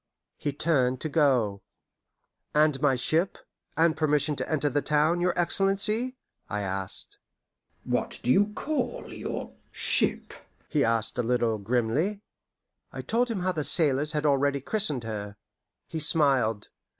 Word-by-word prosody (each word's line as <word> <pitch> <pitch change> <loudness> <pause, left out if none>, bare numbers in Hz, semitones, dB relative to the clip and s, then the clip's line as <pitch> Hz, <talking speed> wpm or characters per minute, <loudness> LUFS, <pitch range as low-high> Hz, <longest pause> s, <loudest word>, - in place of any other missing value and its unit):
He 145 - -2
turned 130 -4 +1
to 155 - -2
go. 125 -10 +2 0.9
"And 150 -2 +3
my 140 -3 +3
ship, 160 +9 0 0.4
and 165 0 +3
permission 150 -1 +1
to - - -4
enter 150 -1 +1
the 145 0 0
town, 155 +4 +1
your 180 0 0
Excellency?" 200 +7 +2 0.3
I 105 -1 -2
asked. 95 -1 -4 0.6
"What - - -2
do 125 - +2
you 205 +8 +4
call 310 0 -3
your - - -6 0.2
ship?" - - -1 0.3
he 145 -2 +1
asked 115 +1 0
a - - +4
little 115 -2 0
grimly. 125 - 0 0.7
I - - -7
told 245 +2 0
him 215 -5 -2
how 185 +1 +1
the 155 -4 -3
sailors 150 -1 +3
had 150 0 -1
already 140 -1 +2
christened 150 - 0
her. 105 -2 -6 0.5
He 160 - -5
smiled. 135 -10 +2
145 Hz, 140 wpm, -27 LUFS, 125-165 Hz, 0.9 s, you